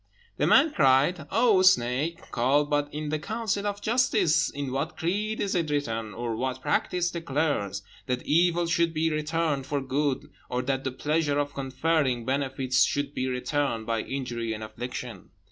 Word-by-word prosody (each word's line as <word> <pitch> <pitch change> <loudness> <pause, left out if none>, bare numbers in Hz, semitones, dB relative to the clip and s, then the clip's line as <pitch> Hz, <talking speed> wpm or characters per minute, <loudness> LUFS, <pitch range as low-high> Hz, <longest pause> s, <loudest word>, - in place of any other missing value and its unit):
The - - +2
man 300 +2 +5
cried, 140 +2 +3
"O 220 -3 +4
snake, 150 -1 +2
call 135 +5 +2
but 145 0 0
in 150 0 -4
the 155 0 -1
counsel 215 +1 -2
of 205 0 -4
justice; 215 - +2
in 140 -2 -4
what 140 +5 -3
creed 210 +6 -1
is 200 - -1
it 170 -4 0
written, 115 -7 -2
or 120 -1 -3
what 130 +2 -2
practice 175 +6 0
declares, 145 - -1 0.2
that 125 0 -2
evil 175 +2 +3
should 170 0 +1
be 160 +1 +1
returned 155 -2 -1
for 145 0 -1
good, 135 +1 -1 0.2
or 125 0 -1
that 135 +1 -2
the 130 - 0
pleasure 150 +2 0
of 145 0 -1
conferring 135 -2 0
benefits 135 -1 +1
should 145 0 -1
be 130 - -2
returned 125 -2 -1
by 115 -1 0
injury 120 -4 -3
and 110 0 -6
affliction?" 120 +2 -7
145 Hz, 165 wpm, -27 LUFS, 130-165 Hz, 0.2 s, man